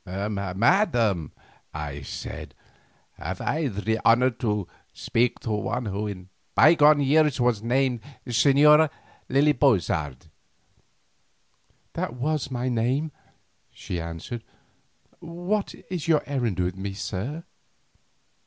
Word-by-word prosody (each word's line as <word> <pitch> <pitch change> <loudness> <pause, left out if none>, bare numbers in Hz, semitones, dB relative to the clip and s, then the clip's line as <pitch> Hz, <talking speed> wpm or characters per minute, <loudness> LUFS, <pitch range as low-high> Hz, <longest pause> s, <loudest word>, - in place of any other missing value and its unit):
"Madam," 100 - +1 0.4
I 75 -1 -5
said, 70 - -7 0.6
"have - - -5
I 155 -1 -1
the 110 0 -2
honour 125 +3 +5
to 105 -6 -2 0.2
speak 120 +1 0
to 115 - -4
one 105 +3 -2
who 105 +1 -3
in 95 -2 -8 0.3
bygone 150 -1 +6
years 150 0 +3
was 120 -4 +2
named 125 +1 +1 0.3
the 125 - -6
Señora 150 +5 +5 0.4
Lily 145 +3 +4
Bozard?" 80 - +1 1.7
"That 120 - -3
was 145 +2 -1
my 125 -1 -3
name," 130 +6 0 0.6
she 90 -2 -6
answered. 85 +8 -6 0.8
"What 175 +5 -3 0.2
is 175 -3 -3
your 155 -3 +3
errand 120 -9 -2
with 90 0 0
me, 95 +1 -5
sir?" 120 - -4
120 Hz, 110 wpm, -25 LUFS, 100-145 Hz, 1.7 s, bygone